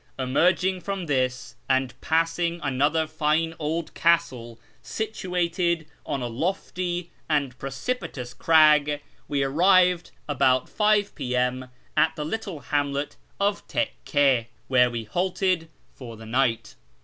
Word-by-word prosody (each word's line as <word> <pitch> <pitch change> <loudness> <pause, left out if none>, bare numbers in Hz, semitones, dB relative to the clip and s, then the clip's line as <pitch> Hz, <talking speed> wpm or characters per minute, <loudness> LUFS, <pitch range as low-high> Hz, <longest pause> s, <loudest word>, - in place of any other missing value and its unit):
Emerging 180 +8 +2
from 195 0 -4
this, 130 -4 -1
and 130 -1 +1
passing 165 +1 0
another 145 +4 +1
line 160 +2 +2
old 160 +2 -3
castle 130 -9 +1 0.2
situated 180 -5 -1 0.2
on 135 - -2
a - - -1
lofty 175 +5 -3 0.2
and 140 -5 0
precipitous 135 - -4
crag, 150 -2 +4 0.2
we 140 -1 0
arrived 180 +4 +4 0.2
about 130 -3 +2
5 210 -1 +2
I'.M. 125 -1 -1 0.3
at 160 0 +3
the 150 -2 -4
little 190 -3 -4
hamlet 145 0 -1 0.2
of 200 0 +1
Tekkc, 140 - +1 0.2
where 125 -1 +4
we 120 -2 -4
halted 180 - 0 0.2
for 115 -4 -10
the 110 - -11
night. 120 0 0
150 Hz, 115 wpm, -25 LUFS, 130-175 Hz, 0.3 s, crag